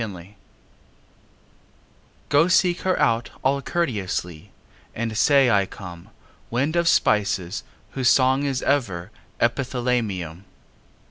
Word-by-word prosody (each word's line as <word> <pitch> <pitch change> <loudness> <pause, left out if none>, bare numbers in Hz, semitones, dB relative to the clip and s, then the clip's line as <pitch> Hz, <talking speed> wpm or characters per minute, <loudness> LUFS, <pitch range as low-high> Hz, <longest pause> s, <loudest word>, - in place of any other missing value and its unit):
XIII 100 -2 -7 1.9
Go 145 +4 +4
seek 180 -1 +2
her 185 -1 0
out 115 0 +1
all 140 +1 +1
courteously, 100 - -3 0.4
And 115 -1 -3
say 135 +1 +4
I 100 -3 +2
come, 90 -5 -11 0.4
Wind 135 +7 -1
of 170 -1 +2
spices 100 - +1 0.3
whose 130 -2 +1
song 130 +1 +3
is 135 -3 -2
ever 105 -10 -1 0.3
Epithalamium. 120 - -1
120 Hz, 105 wpm, -23 LUFS, 100-140 Hz, 1.9 s, Go